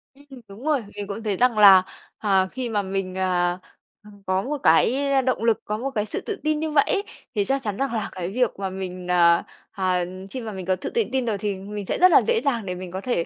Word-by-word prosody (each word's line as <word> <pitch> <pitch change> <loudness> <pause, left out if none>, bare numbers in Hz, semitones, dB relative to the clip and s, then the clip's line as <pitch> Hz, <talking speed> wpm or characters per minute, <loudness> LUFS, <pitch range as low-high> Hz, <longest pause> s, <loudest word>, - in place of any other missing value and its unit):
Ừm, 275 -2 -14
đúng 200 +5 -12
rồi. 295 -6 +1
Mình 205 -1 -5
cũng 210 +3 -6
thấy 205 -4 -1
rằng 245 -3 +2
là, 195 -3 +8 0.3
ờ, 195 -3 +2
khi 255 -2 -4
mà 210 -2 0
mình, 190 -1 -4
ờ, 180 -1 0 0.5
ừm, 205 -1 -16
có 185 0 +1
một 290 +7 -3
cái 260 - +3 0.2
động 255 -3 0
lực, 230 -1 +2
có 210 - -2
một 260 +5 -3
cái 210 -1 0
sự - - -4
tự 420 -2 -5
tin 310 0 +1
như 315 -1 -2
vậy 290 -1 +5
ấy 400 - 0 0.3
thì 205 - +1
chắc 270 +3 0
chắn 205 -4 -4
rằng 275 -2 -1
là 220 -3 -2
cái 180 -2 -5
việc 245 +2 +1
mà 195 - -2
mình, 185 -1 -6
à, 170 -1 +5 0.3
à, 185 -2 0 0.3
khi 260 - -5
mà 225 -2 -6
mình 190 -3 -7
có 185 +1 +1
thự 185 - -5
tự 460 - +1
tin 260 -2 0
rồi 215 -3 -1
thì 205 0 -2
mình 200 +1 -7
sẽ - - -2
rất 365 0 +6
là - - +7
dễ 465 -1 +2
dàng 235 -6 0
để 180 -1 -4
mình 180 0 -8
có 190 +1 -5
thể, 200 -8 -1
210 Hz, 265 wpm, -23 LUFS, 190-255 Hz, 0.5 s, là